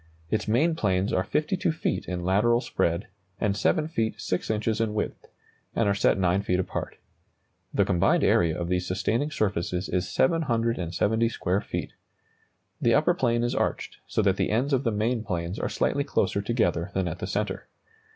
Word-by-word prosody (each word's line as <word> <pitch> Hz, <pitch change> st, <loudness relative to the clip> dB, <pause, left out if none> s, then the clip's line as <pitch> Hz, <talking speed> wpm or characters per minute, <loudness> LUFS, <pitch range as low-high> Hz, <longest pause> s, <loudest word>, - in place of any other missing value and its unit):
Its 110 Hz, -, 0 dB
main 140 Hz, +10 st, +3 dB
planes 95 Hz, -, 0 dB
are 95 Hz, -, +2 dB
52 180 Hz, -, 0 dB
feet 160 Hz, -, -2 dB
in 90 Hz, -1 st, -3 dB
lateral 105 Hz, +6 st, +3 dB
spread, 85 Hz, -5 st, -1 dB, 0.3 s
and 105 Hz, -3 st, +1 dB
7 155 Hz, -, +1 dB
feet 115 Hz, -9 st, -2 dB
6 90 Hz, -, -2 dB
inches 110 Hz, 0 st, 0 dB
in 110 Hz, -2 st, -1 dB
width, 105 Hz, -, -3 dB, 0.5 s
and 115 Hz, -, +2 dB
are 100 Hz, -, +3 dB
set 100 Hz, -, +2 dB
9 95 Hz, 0 st, +2 dB
feet 90 Hz, -2 st, 0 dB
apart. 95 Hz, -, -4 dB, 0.7 s
The -, -, +2 dB
combined 85 Hz, -, +2 dB
area 85 Hz, -1 st, +3 dB
of 85 Hz, -, -2 dB
these 90 Hz, 0 st, -1 dB
sustaining 105 Hz, +10 st, 0 dB
surfaces 95 Hz, -, -1 dB
is 90 Hz, 0 st, -1 dB
770 115 Hz, -, +1 dB
square 95 Hz, -3 st, -1 dB
feet. -, -, -5 dB, 0.9 s
The -, -, +4 dB
upper -, -, +4 dB
plane 120 Hz, -2 st, +1 dB
is 120 Hz, -, 0 dB
arched, -, -, -2 dB
so -, -, 0 dB
that -, -, +2 dB
the -, -, 0 dB
ends 130 Hz, +6 st, +1 dB
of 135 Hz, 0 st, +1 dB
the 115 Hz, -, +2 dB
main 110 Hz, +2 st, 0 dB
planes 90 Hz, -2 st, -3 dB
are -, -, -1 dB
slightly 140 Hz, -, 0 dB
closer 100 Hz, -7 st, 0 dB
together 100 Hz, -5 st, 0 dB
than 95 Hz, -2 st, +1 dB
at 85 Hz, +1 st, -4 dB
the 90 Hz, -, -4 dB
centre. 105 Hz, +2 st, -3 dB
105 Hz, 180 wpm, -26 LUFS, 90-120 Hz, 0.9 s, The